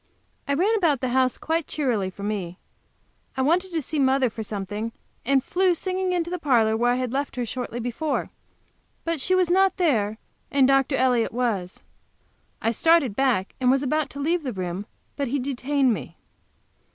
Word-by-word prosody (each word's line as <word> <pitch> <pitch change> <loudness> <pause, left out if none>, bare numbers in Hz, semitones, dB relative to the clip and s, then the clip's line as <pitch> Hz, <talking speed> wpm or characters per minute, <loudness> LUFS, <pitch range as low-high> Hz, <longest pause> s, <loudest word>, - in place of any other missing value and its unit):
I 280 - +1
ran 385 +9 +2
about 320 - +2
the 255 - -1
house 255 0 +2
quite 325 0 -1
cheerily, 235 -10 -1
for 200 +2 -10
me. 195 -4 -3 0.8
I 265 - +2
wanted 360 +6 +1
to 325 -3 -2
see 305 +3 -3
mother 265 -2 +3
for 220 - -6
something, 210 +2 -4 0.3
and 270 -1 +3
flew 365 +3 +2
singing 370 +1 -2
into 345 -1 -1
the 360 - -2
parlor, 235 -8 +3
where 240 +2 +2
I - - +2
had 255 -1 -2
left 280 +1 -2
her 245 -1 -2
shortly 240 0 -5
before. 245 +6 -2 0.7
But 330 -3 -1
she 370 - +2
was 370 -1 +3
not 380 +2 +3
there, 220 - +1 0.3
and 275 -2 +4
Dr. 270 0 +3
Elliott 250 -3 +2
was. 220 -7 -2 0.8
I 225 - +2
started 300 -3 +3
back, 250 -8 +1
and 250 - +3
was 270 +2 +3
about 305 +2 0
to 280 - -9
leave 330 +5 +1
the 260 -5 -4
room, 185 +2 -4 0.3
but 280 -2 -1
he 270 +4 -1
detained 270 0 +1
me. - - -7
265 Hz, 185 wpm, -24 LUFS, 230-315 Hz, 0.8 s, and